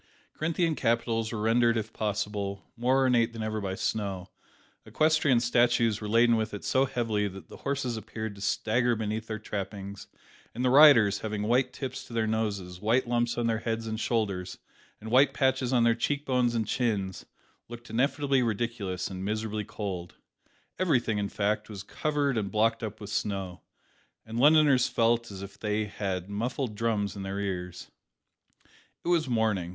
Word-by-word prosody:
Corinthian 165 +1 0
capitals 115 -3 0
were 115 - -4
rendered, 115 +1 +3
if 110 0 -4
possible, 105 -1 -3
more 125 +3 +2
ornate 120 -3 +3
than 115 -1 -5
ever 110 0 -2
by 95 -1 -3
snow; 100 -3 -3 0.5
equestrian 155 -5 +3
statues 120 -2 +2
were 105 - -4
laden 115 +1 +4
with 110 -1 -2
it 100 - -8
so 130 +1 +2
heavily, 115 -5 -1
that 95 0 -10
the - - -11
horses 135 -4 -2
appeared 110 0 -6
to 100 - -13
stagger 120 +4 +1
beneath 110 0 -3
their 110 - -3
trappings 100 -1 -6 0.5
and 125 +2 -1
the 125 - +3
riders, 125 -8 +7
having 105 -1 -3
white 125 +4 +2
tips 130 -2 -6
to - - -12
their 115 -1 +1
noses, 100 -5 -2
white 120 +4 +2
lumps 120 0 0
on 120 - 0
their 115 -1 +1
heads 115 0 -3
and 110 -1 -3
shoulders, 100 -7 -1 0.4
and 110 +1 -8
white 135 +2 +5
patches 130 -1 +1
on 120 -2 +3
their 115 0 +5
cheek 145 +5 -2
bones 125 -2 +1
and 110 -1 0
chins, 105 -8 -1 0.4
looked 120 0 -10
ineffably 135 +2 +1
ridiculous, 110 -5 -2
and 95 -1 -6
miserably 110 +1 -2
cold. 95 -5 -6 0.6
Everything, 125 - +1
in 100 -1 -2
fact, 105 +1 -1
was 100 -2 -7
covered 145 +1 -1
and 100 -2 -3
blocked 115 +2 +1
up 110 -2 -5
with 105 0 -8
snow, 95 -4 -3 0.6
and 115 +1 -4
Londoners 145 -2 +5
felt 115 0 +1
as 100 -1 -8
if 100 0 -11
they 105 0 -1
had 95 -3 -4
muffled 115 +4 -3
drums 105 -2 -1
in 100 - -6
their 95 +1 -4
ears. 90 -3 -5 1.1
It - - -1
was 165 -5 +2
morning. 110 -7 +1
110 Hz, 170 wpm, -28 LUFS, 105-120 Hz, 1.1 s, riders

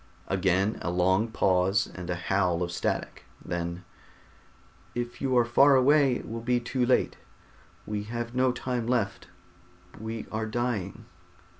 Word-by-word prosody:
Again 95 +2 +1
a - - -2
long 95 +5 +2
pause 95 -2 +2
and 90 -1 -7
a 90 - 0
howl 90 -1 0
of 85 - -3
static. 85 - -3 0.2
Then: 85 +1 -4 1.1
"If 120 0 -4
you 130 -2 +2
are 120 - +5
far 135 +4 +5
away 135 0 +4
it - - -6
will 115 +1 -5
be 125 +1 +1
too 125 +1 -1
late. 125 +1 +2 0.7
We 105 -1 -3
have 120 +1 -4
no 130 0 +3
time 125 -1 -3
left, 120 -5 -1 0.7
we 110 +1 -5
are 110 0 -2
dying...." 115 -2 -3
110 Hz, 145 wpm, -28 LUFS, 95-120 Hz, 1.1 s, are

